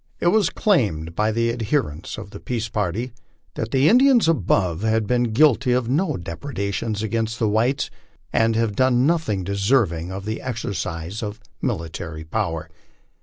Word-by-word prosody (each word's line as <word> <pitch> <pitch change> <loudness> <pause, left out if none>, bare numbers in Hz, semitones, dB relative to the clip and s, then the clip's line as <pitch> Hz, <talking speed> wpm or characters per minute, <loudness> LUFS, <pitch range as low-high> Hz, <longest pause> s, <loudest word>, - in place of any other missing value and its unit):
It 175 - +3
was 205 -3 +3
claimed 100 - +1
by 110 +3 +1
the 115 +1 +1
adherents 110 - -2
of 100 - -8
the 100 - -8
peace 115 -2 -3
party 105 +5 -2 0.4
that 110 - -3
the 135 +4 +3
Indians 250 - +5
above 95 - +1
named 110 0 +1
had 110 -1 +1
been 120 +2 +2
guilty 130 0 +4
of 125 -2 0
no 155 +3 +1
depredations 100 +3 -3
against 115 +1 -1
the 115 - +1
whites, 115 +6 +1 0.4
and 115 0 +3
had 115 -2 0
done 130 +1 +3
nothing 155 - +1
deserving 100 -3 +1
of 95 +1 -6
the 110 +1 -3
exercise 100 -6 -4
of 105 0 -5 0.2
military 80 -1 -4
power. 80 -2 -2
110 Hz, 160 wpm, -22 LUFS, 100-130 Hz, 0.4 s, Indians